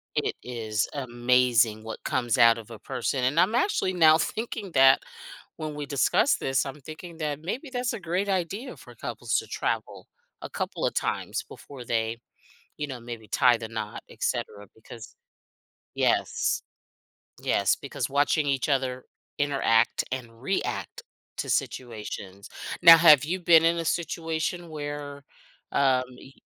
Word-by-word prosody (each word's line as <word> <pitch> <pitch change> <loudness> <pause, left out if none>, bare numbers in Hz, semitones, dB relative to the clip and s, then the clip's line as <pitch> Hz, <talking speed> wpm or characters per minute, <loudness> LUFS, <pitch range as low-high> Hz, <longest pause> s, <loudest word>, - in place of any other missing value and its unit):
it - - 0
is 110 -4 -2
amazing 120 -4 +2
what 110 0 -7
comes 120 -3 0
out 115 0 +6
of 115 0 -10
a 110 - -9
person. 130 +1 -2
And 140 +6 +2
I'm 210 +5 +2
actually 245 - +1
now 160 -3 +6
thinking 215 +2 -4
that 135 0 +6 0.6
when 155 -1 -5
we 145 0 -4
discuss 140 -1 +2
this, 135 -1 0
I'm 140 +2 -7
thinking 160 +4 -10
that 150 -2 -3
maybe 250 - -5
that's 245 -1 -1
a 230 - -5
great 185 +3 -2
idea 195 +7 -2
for - - -14
couples - - -4
to - - -9
travel - - -3 0.3
a - - -7
couple - - -3
of - - -3
times - - -2
before 135 -4 -11
they, 115 0 -1 0.6
you 150 - -2
know, 130 -4 -7
maybe 115 -2 -9
tie 120 +3 +4
the 115 - -6
knot, 110 -2 -5
etcetera, 105 0 -3
because 110 0 -12 0.8
yes, - - +1 0.8
yes, - - +2
because - - -4
watching 145 +2 +2
each 135 -1 0
other 130 -2 -1 0.3
interact 135 -6 +2
and 120 -3 -6
react 195 - -3 0.4
to - - -3
situations. 105 -5 -4 0.3
Now 165 -1 +11
have 155 -4 +7
you 180 +5 -2
been 165 -2 +6
in 170 +1 +3
a 165 - -2
situation 165 +1 -2
where, 145 -2 -6 0.5
um, 130 -2 +3
y 135 - -14
140 Hz, 150 wpm, -26 LUFS, 120-165 Hz, 0.8 s, Now